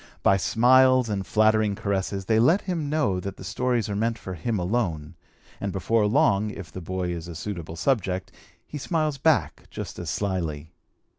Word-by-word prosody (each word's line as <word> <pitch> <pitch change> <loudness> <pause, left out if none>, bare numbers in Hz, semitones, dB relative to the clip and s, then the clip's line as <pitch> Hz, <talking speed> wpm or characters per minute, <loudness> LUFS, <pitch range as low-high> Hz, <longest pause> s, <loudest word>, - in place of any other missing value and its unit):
By 100 - +5
smiles 130 +4 +4
and 100 -3 -3
flattering 110 -1 +3
caresses 100 -1 -2
they 110 +1 +3
let 165 - +4
him 165 -6 -3
know 145 -12 +1
that 100 +1 -6
the - - -10
stories 120 0 -1
are 100 - -3
meant 115 +2 0
for 95 - -7
him 105 +7 -2
alone, 90 -5 -1 0.5
and 100 - -3
before 105 +3 +1
long, 105 -3 +3
if 95 -6 -8
the 95 - -7
boy 90 +1 -3
is 85 -1 -5
a 85 - -8
suitable 85 -2 -6
subject, 95 -1 -1 0.3
he 150 - -7
smiles 155 -2 -1
back 155 +1 +1
just - - -7
as - - -5
slyly. 80 -6 -3
105 Hz, 175 wpm, -25 LUFS, 95-120 Hz, 0.5 s, By